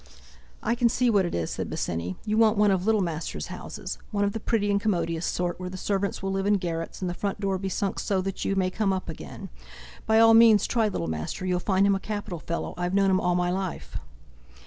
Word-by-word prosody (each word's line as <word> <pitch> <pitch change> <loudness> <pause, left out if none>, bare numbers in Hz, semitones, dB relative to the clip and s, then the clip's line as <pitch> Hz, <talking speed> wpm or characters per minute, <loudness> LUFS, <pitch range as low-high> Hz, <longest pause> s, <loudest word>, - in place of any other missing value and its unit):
"I 230 - +1
can 240 0 +3
see 245 0 +2
what 195 -4 +3
it - - -4
is," 85 -2 -2
said - - -4
Bosinney, 85 +2 -3
"you 215 - 0
want 220 -1 +4
one 210 -1 +4
of 185 -1 0
Littlemaster's 175 -7 0
houses—one 205 -2 -5
of 200 0 0
the 225 - -3
pretty 205 -2 0
and 200 0 +1
commodious 170 -5 0
sort, 175 0 -2
where 180 0 -4
the 185 - -7
servants 200 +1 -2
will 195 - -1
live 195 +1 -1
in 205 - +4
garrets, 170 -3 -4
and 185 - -1
the 175 - -2
front 200 +2 -3
door 195 -2 -1
be 195 0 -3
sunk 195 +1 -2
so 195 -2 0
that 195 0 -4
you 195 - 0
may 185 -1 +1
come 205 0 0
up 185 -2 -4
again. 190 +4 -8 0.6
By 220 0 +4
all 225 0 +7
means 225 -2 +7
try 225 -3 +1
Littlemaster, 80 - -3
you'll 180 -1 +1
find 190 +1 +2
him 200 - +4
a 195 - 0
capital 205 -4 -5
fellow, 170 +2 -4
I've 175 +1 -1
known 195 -1 +4
him 185 - +2
all 180 0 +1
my 175 0 +1
life!" 180 - -4
195 Hz, 235 wpm, -26 LUFS, 175-205 Hz, 0.6 s, all